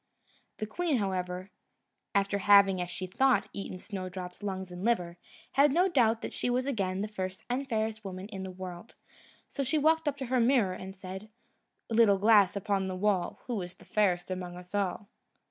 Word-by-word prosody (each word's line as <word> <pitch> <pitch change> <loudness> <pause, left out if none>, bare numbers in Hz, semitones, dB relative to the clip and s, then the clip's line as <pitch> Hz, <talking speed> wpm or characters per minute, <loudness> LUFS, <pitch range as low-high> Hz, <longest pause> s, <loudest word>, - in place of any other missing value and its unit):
The 215 - -3
queen, 310 +6 0
however, 185 -2 -2 0.6
after 200 0 +2
having, 195 -2 +6
as 175 - -3
she 185 - -4
thought, 205 +1 +2
eaten 195 -2 -5
Snowdrop's 185 -1 -6
lungs 190 -2 -4
and 180 +1 -7
liver, 175 -7 0 0.3
had 280 +1 +5
no 355 +6 +4
doubt 235 -9 +2
that - - -4
she - - 0
was 250 +1 +1
again 195 -8 -1
the 210 - -1
first 190 -3 -5
and 270 +2 -2
fairest 220 -1 -1
woman 190 -1 -6
in 195 -3 -6
the 190 - -5
world; 185 +2 -8 0.5
so 280 - -3
she 275 +4 +1
walked 320 +1 +3
up 285 -1 0
to 270 - -4
her 255 +1 +1
mirror, 230 -6 +3
and 190 +1 -8
said: 190 +2 -8 0.6
"Little 225 -3 +5
glass 205 -1 +5
upon 200 -1 0
the 185 - -3
wall, 190 -2 0
Who 235 -6 -2
is 175 0 -7
fairest 185 -4 0
among 180 -1 -4
us 180 +1 -12
all?" 200 0 -1
200 Hz, 185 wpm, -30 LUFS, 185-230 Hz, 0.6 s, having